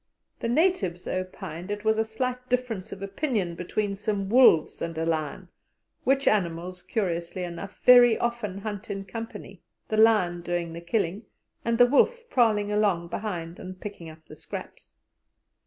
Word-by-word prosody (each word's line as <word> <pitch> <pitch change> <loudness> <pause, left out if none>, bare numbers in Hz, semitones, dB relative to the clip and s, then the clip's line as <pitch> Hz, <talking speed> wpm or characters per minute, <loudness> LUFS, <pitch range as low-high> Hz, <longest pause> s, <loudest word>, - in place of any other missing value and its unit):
The 230 - -2
natives 235 - +1
opined 185 -1 -5
it 205 +1 -4
was 220 0 +3
a - - +4
slight 250 +3 -4
difference 245 -6 -1
of 195 - -7
opinion 200 - -1
between 200 +4 -2
some 200 -1 -2
wolves 230 -9 +5
and 165 -1 -4
a 165 - -1
lion, 160 +2 -2 0.6
which 270 +1 +2
animals, 180 -2 0
curiously 180 -4 -2
enough, 175 +3 -7
very 245 -2 +8
often 235 -5 -2
hunt 205 +1 -6
in 195 0 -4
company, 205 -2 -8 0.3
the 215 - 0
lion 210 -6 +4
doing 175 -1 -3
the 170 - -7
killing, 195 +3 -1 0.4
and 230 0 +1
the 245 - +8
wolf 470 - +2
prowling 215 -4 +3
along 200 -5 +1
behind 170 -4 -4
and 185 0 -8
picking 190 -5 -8
up 160 0 -15
the 155 - -12
scraps. - - -9
200 Hz, 155 wpm, -26 LUFS, 175-225 Hz, 0.6 s, very